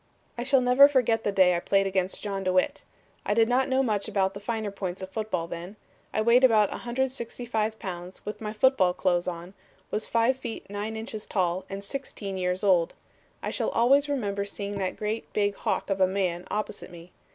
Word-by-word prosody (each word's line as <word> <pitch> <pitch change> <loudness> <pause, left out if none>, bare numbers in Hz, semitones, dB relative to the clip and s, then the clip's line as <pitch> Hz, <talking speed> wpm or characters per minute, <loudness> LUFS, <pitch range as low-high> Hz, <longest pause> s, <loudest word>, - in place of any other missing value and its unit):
"I 240 - -4
shall 265 +1 +3
never 250 +3 +7
forget 245 -5 +2
the 205 - +1
day 185 -2 +4
I - - 0
played 195 +2 +2
against 190 -1 -1
John 195 -2 -3
DeWitt. 185 0 +1 0.4
I 205 - 0
did 225 0 +4
not 255 +2 +2
know 265 +1 +3
much 210 -5 -1
about 190 -1 +1
the 200 - -7
finer 220 -1 -3
points 190 -1 -4
of 190 - -7
football 215 -6 -2
then. 170 +4 -7 0.4
I 215 - 0
weighed 235 +3 +5
about 220 -5 +5
165 240 -3 -2
pounds 180 -1 -7
with 210 - -6
my 210 -1 -3
football 215 -5 +3
clothes 175 -2 +1
on, 175 +1 -5 0.4
was 215 - -2
five 235 +3 +2
feet 230 - -6
nine 210 +2 -4
inches 220 -1 -6
tall 185 -1 0
and 195 +1 -6
sixteen 200 -4 -5
years 180 +1 -1
old. 180 -4 +3 0.5
I - - -2
shall - - -1
always 275 +5 +3
remember 205 -8 -1
seeing 200 0 -5
that 185 -1 -2
great 215 +1 -3
big 205 -1 +1
hawk 200 - -2
of 195 0 0
a 185 - +6
man 185 -2 -1
opposite 210 -1 -3
me. 175 0 -13
205 Hz, 195 wpm, -27 LUFS, 185-230 Hz, 0.5 s, never